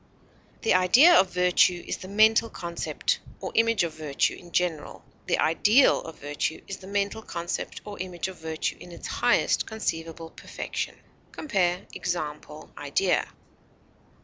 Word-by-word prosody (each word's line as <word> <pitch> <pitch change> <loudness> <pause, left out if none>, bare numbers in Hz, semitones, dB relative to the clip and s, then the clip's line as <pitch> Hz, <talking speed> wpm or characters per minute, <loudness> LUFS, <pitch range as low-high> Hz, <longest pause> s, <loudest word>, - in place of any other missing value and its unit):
The 225 - +3
idea 185 - +6
of 190 - +5
virtue 180 0 +3
is - - -3
the 185 - -10
mental 220 +3 +4
concept 170 -4 -2 0.2
or - - -5
image 230 -3 +3
of 165 -2 -3
virtue 150 -3 0
in 175 -1 -14
general; 170 -4 -2 0.2
the - - +2
ideal 210 - +4
of 160 - -10
virtue 145 +2 -3
is 195 - -5
the 190 - -13
mental 200 +2 -1
concept 170 -4 -5
or 205 -1 -8
image 180 -1 -4
of 190 - -9
virtue 160 -1 -3
in 175 - -12
its - - -10
highest - - +1
conceivable 165 -6 -4
perfection. - - -5 0.4
Compare 185 - -1
EXAMPLE; 150 -3 -5
IDEA. 160 +6 +1
180 Hz, 145 wpm, -26 LUFS, 165-205 Hz, 0.4 s, idea